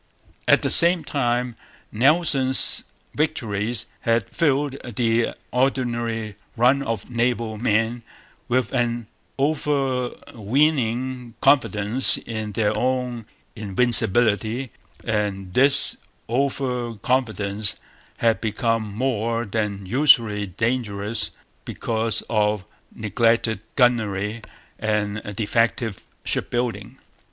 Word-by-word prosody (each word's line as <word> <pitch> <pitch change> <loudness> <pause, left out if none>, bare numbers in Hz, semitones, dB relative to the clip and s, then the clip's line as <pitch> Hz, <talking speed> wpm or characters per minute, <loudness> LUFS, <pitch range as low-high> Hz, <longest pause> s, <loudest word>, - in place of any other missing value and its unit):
At - - +4
the - - +1
same 170 0 +6
time, 125 -4 -2 0.4
Nelson's 135 +1 +3 0.3
victories 115 -7 -1
had 115 -1 0
filled 145 -4 0 0.2
the 115 0 0 0.2
ordinary 120 -5 -2 0.2
run 130 +4 +3
of 115 -3 -5
naval 115 -2 -1
men 115 +1 0 0.5
with 125 0 -1
an 120 -2 -1 0.3
over 135 -3 0 0.2
weening 125 0 -1
confidence 130 -3 +6
in 110 -2 -6
their 105 0 0
own 125 -3 -2 0.3
invincibility; 110 +2 +2 0.3
and 100 -4 -3
this 135 +3 +6 0.3
over 125 -2 -2
confidence 110 -3 -1 0.4
had 115 -1 +1
become 110 0 -1
more 115 -1 -1
than 100 -2 -3
usually 115 -3 +3
dangerous 110 +1 -2 0.3
because 115 -1 -2
of 105 -3 0 0.3
neglected 115 0 0 0.2
gunnery 110 -4 0 0.4
and 105 -1 -2
defective 115 0 -1 0.2
shipbuilding. 120 0 -2
115 Hz, 90 wpm, -22 LUFS, 110-125 Hz, 0.5 s, same